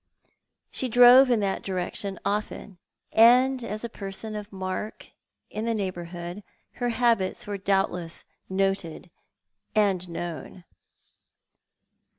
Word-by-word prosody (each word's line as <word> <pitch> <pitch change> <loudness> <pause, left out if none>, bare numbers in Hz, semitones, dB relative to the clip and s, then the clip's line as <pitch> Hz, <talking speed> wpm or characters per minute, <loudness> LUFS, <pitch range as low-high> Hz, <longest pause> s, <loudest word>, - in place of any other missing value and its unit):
She 260 - -2
drove 245 +3 +8
in 235 -3 +3
that 195 -1 -1
direc 185 -2 -3
tion 200 -3 -3
often, 205 -2 -3 0.3
and 250 +3 +5
as 215 -1 -5
a - - -2
person 215 0 -6
of 210 0 -7
mark 190 +2 -5 0.4
in 215 +2 -4
the 230 -1 0
neighbourhood 175 -1 -5 0.4
her 245 - +1
habits 230 -5 +1
were 205 -1 -4
doubtless 190 -3 -1 0.2
noted 190 -3 -2 0.6
and 195 -4 +2
known. 170 +1 -6
200 Hz, 115 wpm, -26 LUFS, 185-225 Hz, 0.6 s, drove